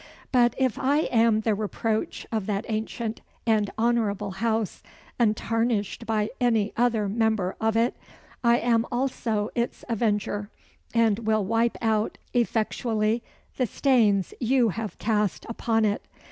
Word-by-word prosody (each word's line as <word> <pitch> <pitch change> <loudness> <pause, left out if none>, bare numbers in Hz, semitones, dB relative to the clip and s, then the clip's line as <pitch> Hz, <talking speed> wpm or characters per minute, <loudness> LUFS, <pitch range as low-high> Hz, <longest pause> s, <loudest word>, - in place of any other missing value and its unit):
But 240 -2 +4
if 260 -4 +1
I 285 +3 +2
am 225 -2 +4
the 220 0 +1
reproach 215 +1 -2
of 215 -3 -2
that 205 -1 -1
ancient 220 0 -3 0.2
and 215 -3 +2
honourable 220 -3 +1
house 220 +1 -1 0.4
untarnished 225 -1 0
by 215 -1 0
any 225 -4 +2
other 230 -3 +2
member 220 -3 0
of 225 0 +2
it 235 +2 +2 0.5
I 235 0 +5
am 230 -1 +2
also 235 -4 -1
its 235 0 -2
avenger, 210 -3 -1 0.4
and 225 -2 +3
will 215 -2 +1
wipe 230 +3 +1
out 220 -1 +1 0.2
effectually 225 -1 0 0.4
the 255 - +1
stains 215 - +2
you 245 -1 +3
have 220 +1 -5
cast 210 -3 0
upon 225 -1 +1
it. 205 0 0
225 Hz, 130 wpm, -26 LUFS, 210-235 Hz, 0.5 s, I